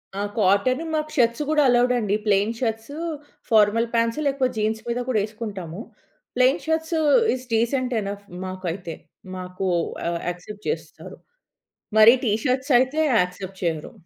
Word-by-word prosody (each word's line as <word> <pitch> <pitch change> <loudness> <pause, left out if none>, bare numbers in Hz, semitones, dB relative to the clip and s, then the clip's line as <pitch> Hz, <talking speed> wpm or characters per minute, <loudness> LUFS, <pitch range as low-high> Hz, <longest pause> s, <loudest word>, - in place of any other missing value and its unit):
ఆ! - - -4 0.2
కాటన్. 205 - +2
మాకు 310 0 -2
షర్ట్స్ 235 +2 +2
గూడా 305 -1 +3
అలోవెడండి. 240 -4 +2
ప్లెయిన్ 205 +2 +2
షర్ట్స్, 225 +2 -3 0.6
ఫార్మల్ 220 +1 +4
ప్యాంట్స్ 230 +4 +1
లేకపోతే 265 -2 0
జీన్స్ 220 +1 -1
మీద 240 +1 -1
కూడా 220 -4 +2
ఎసుకుంటాము. 210 -5 -7 0.5
Plain 255 +3 +3
shirts 320 +1 -1 0.4
is 255 0 -9
decent 245 +2 +1
enough 200 0 -6 0.2
మాకైతే. 185 -2 -5 0.4
మాకు 185 +1 -5 0.4
ఆహ్, 170 0 -1
యాక్సెప్ట్ 200 +4 -8
చేస్తారు. 460 - -6 0.8
మరి 220 +2 +9
టీ 215 - +2
షర్ట్స్ 260 +1 0
అయితే 260 +5 0 0.2
యాక్సెప్ట్ 185 +1 -4
చేయరు. 160 -3 -2
225 Hz, 130 wpm, -23 LUFS, 195-255 Hz, 0.8 s, మరి